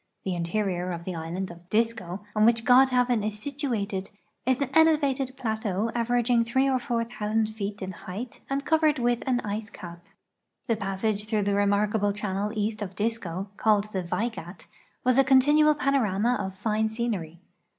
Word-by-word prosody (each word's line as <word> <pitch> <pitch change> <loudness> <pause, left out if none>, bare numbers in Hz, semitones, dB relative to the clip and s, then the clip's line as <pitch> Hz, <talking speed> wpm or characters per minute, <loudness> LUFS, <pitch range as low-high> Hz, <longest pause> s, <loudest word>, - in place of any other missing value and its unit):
The 190 - -2
interior 180 +1 -1
of 170 0 -6
the 185 - -3
island 170 +3 -4
of 170 +1 -15
Disko, 215 -4 -1
on 215 - +3
which 230 +1 +4
Godhavn 250 -3 +4
is 210 0 -2
situated, 215 -7 -3 0.4
is 260 -1 +3
an 275 -2 -1
elevated 285 -5 +3
plateau 220 -3 -1
averaging 240 0 +2
three 260 +4 +1
or 260 -1 +2
four 240 -3 -1
thousand 220 -1 -1
feet 205 -2 -5
in 190 - -4
height 195 +7 -8
and 275 +1 -2
covered 310 -2 +3
with 240 -1 +1
an 250 -2 +1
ice 210 +1 -4
ca]). 175 -5 -9 0.7
The 230 - +1
passage 205 +1 -2
through 215 -1 0
the 200 0 0
remarkable 205 +1 +2
channel 205 0 -2
east 215 +1 -2
of 190 -2 -5
Disko, 205 -4 -3
called 210 -1 +2
the 190 - -1
Vaigat, 180 -1 -4 0.4
was 255 +1 +4
a - - +7
continual 295 +3 +5
|)anorama 245 -5 +1
of 190 -1 -4
fine 215 +2 0
scenery. 210 -8 -3
215 Hz, 165 wpm, -26 LUFS, 200-245 Hz, 0.7 s, a